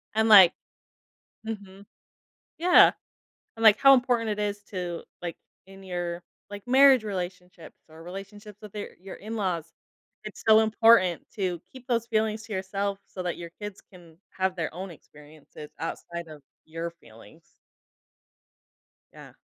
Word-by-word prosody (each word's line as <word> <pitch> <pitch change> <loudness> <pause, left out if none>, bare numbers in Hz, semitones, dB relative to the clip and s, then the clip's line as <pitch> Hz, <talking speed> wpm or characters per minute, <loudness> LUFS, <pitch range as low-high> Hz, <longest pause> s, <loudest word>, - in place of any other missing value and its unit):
And 220 0 +2
like 195 -5 +9 0.9
mhm. 200 -2 -8 0.7
Yeah. 355 +2 +6 0.7
And, 225 - -7
like, 215 -1 +7
how 275 0 +8
important 245 -3 +1
it 210 - -3
is 205 0 -3
to, 175 -3 -5 0.2
like, 170 -1 -5 0.3
in 195 0 -14
your, 175 -1 -4 0.3
like, 205 -1 -9
marriage 260 -1 +6
relationships 180 -3 -7
or 160 +1 -14
relationships 200 +3 -10
with 210 -1 -12
your 205 - -5
your 190 +1 -9
in 220 +3 -7
laws. 170 -5 -3 0.5
It's 215 - -9
so 220 0 +7
important 220 -5 +4
to 180 -4 -2
keep 260 -1 -13
those 235 -2 0
feelings 220 -1 0
to 225 - -9
yourself 195 +1 -3
so 185 - -7
that 175 -1 -3
your 170 -1 -8
kids 205 -1 -7
can 170 -2 -17 0.2
have 185 0 0
their 160 -1 -4
own 190 +1 -6
experiences 150 -1 -14
outside 170 +1 -6
of 150 -2 -12 0.2
your 165 +1 -5
feelings. 160 +2 -19 1.6
Yeah. - - -13
195 Hz, 145 wpm, -26 LUFS, 170-215 Hz, 1.6 s, like